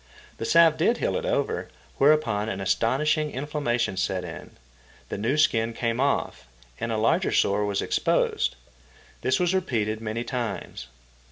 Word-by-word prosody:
The - - -4
salve 165 +3 +5
did 230 +9 +2
heal - - -1
it - - -2
over, - - -1 0.3
whereupon 125 -8 +3
an 100 - -4
astonishing 145 - +1
inflammation 130 -7 -2
set 95 -1 -1
in, 80 -3 -9 0.5
the - - -4
new 120 +8 0
skin 115 -6 +2
came 115 +1 -2
off, 140 - -1 0.3
and 115 - -2
a 110 - 0
larger 165 - +2
sore 105 +1 +2
was 100 -1 -1
exposed. - - +1 0.7
This 130 0 +1
was 180 0 +1
repeated 110 - -1
many 110 +1 -3
times. 115 - -5
120 Hz, 150 wpm, -25 LUFS, 110-150 Hz, 0.7 s, salve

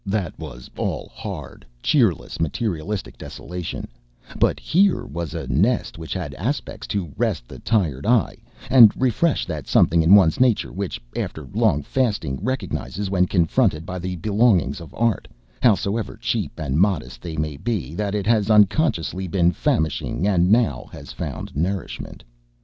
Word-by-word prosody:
That 95 -3 -2
was - - -9
all - - -3
hard, - - -7 0.2
cheerless, - - +1
materialistic 85 - -3
desolation, 90 -1 -6 0.5
but - - +2
here 175 -8 +2
was 85 - -5
a - - -4
nest 85 - 0
which 80 - -8
had 85 -6 -4
aspects 120 - -4
to 90 -8 -3
rest - - -1
the - - -10
tired 90 - 0
eye 120 -4 +2 0.3
and 120 -5 +9
refresh 130 +6 +1
that 80 -6 -5
something 85 0 +4
in 85 +5 +7
one's 90 -6 +4
nature 125 -4 +2
which, 95 0 -4 0.2
after 80 - -4
long 75 0 +2
fasting, 105 - -1
recognizes, 105 -6 -3
when 90 -2 +3
confronted 85 -1 +1
by 90 +1 -5
the 90 +1 -4
belongings 100 - +2
of 85 - -10
art, 115 -1 0 0.3
howsoever 110 -2 +1
cheap - - -2
and 75 -1 -1
modest 95 -3 0
they 80 -3 -6
may 75 -1 -2
be, 90 - -3
that 100 +3 -2
it 100 - -1
has 110 -2 +2
unconsciously 105 - +2
been 85 -1 +2
famishing 80 +1 -1
and 90 -2 +3
now 115 +1 +2
has - - -10
found - - -6
nourishment. 90 +5 -3
95 Hz, 150 wpm, -22 LUFS, 80-110 Hz, 0.5 s, and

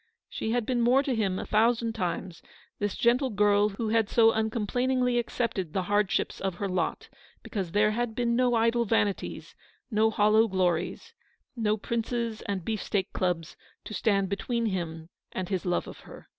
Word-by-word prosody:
She - - -4
had 240 0 0
been 245 0 0
more 250 +4 +4
to 275 - -1
him 200 -5 0
a - - -4
thousand 230 +1 +2
times, 180 -4 -3 0.4
this 205 -1 -1
gentle 250 +3 +2
girl 205 -1 +3
who 215 +2 -3
had 225 -1 +2
so 225 -1 +5
uncomplainingly 240 +3 0
accepted 210 -8 -2
the 190 - 0
hardships 205 +1 0
of 190 -2 -2
her 200 +3 -3
lot, 185 -1 -2 0.4
because 190 -6 -4
there 210 +1 +4
had 230 0 -2
been 235 -1 +1
no 250 -1 +3
idle 230 +1 +2
vanities, 205 -3 -1 0.4
no 220 +1 +3
hollow 215 +1 +4
glories, 185 - -1 0.4
no 215 -2 +1
Prince's 230 0 -2
and 195 -4 -3
Beefsteak 205 -3 -2
Clubs, 170 -3 -1 0.3
to - - -8
stand 200 -2 +1
between 230 +4 -2
him 165 -5 -3 0.2
and 185 -1 -4
his 190 -2 -2
love 175 - 0
of - - -10
her. - - -13
215 Hz, 170 wpm, -28 LUFS, 195-235 Hz, 0.4 s, so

